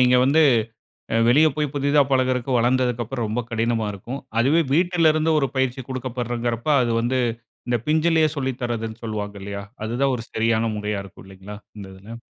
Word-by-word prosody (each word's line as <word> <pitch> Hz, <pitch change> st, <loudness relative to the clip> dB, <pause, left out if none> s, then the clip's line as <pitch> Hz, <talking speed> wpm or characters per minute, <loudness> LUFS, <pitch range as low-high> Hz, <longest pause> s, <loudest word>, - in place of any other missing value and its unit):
நீங்க 125 Hz, 0 st, +5 dB
வந்து, 145 Hz, +5 st, +4 dB, 0.7 s
அ -, -, +2 dB
வெளிய 150 Hz, +6 st, +6 dB
போய், 150 Hz, -2 st, -1 dB
புதிதா 145 Hz, +1 st, +3 dB
பழகறக்கு, 130 Hz, -1 st, +1 dB
வளந்தததுக்கு 125 Hz, 0 st, +1 dB
அப்புறம் 120 Hz, -1 st, -3 dB
ரொம்ப 120 Hz, +3 st, -2 dB
கடினமா 115 Hz, -1 st, 0 dB
இருக்கும். 120 Hz, +8 st, -7 dB, 0.2 s
அதுவே 150 Hz, +7 st, +3 dB
வீட்டில 170 Hz, 0 st, +3 dB
இருந்து 155 Hz, +1 st, +1 dB
ஒரு 135 Hz, -, 0 dB
பயிற்சி 130 Hz, 0 st, -1 dB
கொடுக்கப்படுறங்கிறப்ப 120 Hz, -1 st, -3 dB
அது 120 Hz, -1 st, 0 dB
வந்து 130 Hz, +2 st, 0 dB, 0.5 s
இந்த 120 Hz, -, +1 dB
பிஞ்சிலே 160 Hz, +1 st, +3 dB
சொல்லி 130 Hz, -1 st, -1 dB
தரதுன்னு 115 Hz, -1 st, -4 dB
சொல்வாங்க 105 Hz, -2 st, -4 dB
இல்லையா? 100 Hz, 0 st, -5 dB, 0.2 s
அதுதான் 130 Hz, +4 st, 0 dB
ஒரு 115 Hz, -, -7 dB
சரியான 115 Hz, 0 st, +1 dB
முறையா 105 Hz, -1 st, -3 dB
இருக்கும் 95 Hz, 0 st, -14 dB
இல்லைங்களா? 95 Hz, +2 st, -10 dB, 0.2 s
இந்த 100 Hz, -, -8 dB
இதில. 105 Hz, +5 st, -10 dB
120 Hz, 165 wpm, -22 LUFS, 115-135 Hz, 0.7 s, வெளிய